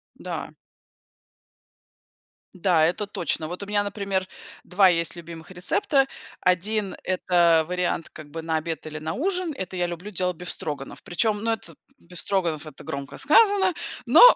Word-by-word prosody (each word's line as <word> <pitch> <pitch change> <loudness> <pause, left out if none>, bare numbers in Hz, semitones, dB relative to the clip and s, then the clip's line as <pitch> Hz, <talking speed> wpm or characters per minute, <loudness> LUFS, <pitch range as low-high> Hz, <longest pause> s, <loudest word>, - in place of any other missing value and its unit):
Да. - - -5 2.0
Да, 175 -3 +3
это 180 +5 0
точно. 165 -5 -1
Вот, 180 +4 -5
у - - -5
меня, 205 0 +1
например, 200 -2 -2 0.4
2 190 +1 +5
есть 170 0 +1
любимых 170 0 -9
рецепта. 210 - +2 0.3
1- 195 +2 +1
это 175 -3 +3
вариант, 180 -2 -1
как 150 -1 -11
бы, 165 - -5
на 160 0 0
обед 160 -1 -4
или 155 0 -6
на 155 +1 -3
ужин. 360 +1 -1
Это 190 -3 -5
я 180 -1 +1
люблю 175 +4 -6
делать 180 -3 0
бефстроганов. 150 -5 -4
Причём, 205 +3 +1
но 230 0 +2
это, 225 - -7 0.2
бефстроганов- 170 -3 -1
это 145 - -11
громко 140 0 -5
сказано, 385 +3 +5 0.3
но, - - +7
180 Hz, 145 wpm, -25 LUFS, 165-205 Hz, 2.0 s, но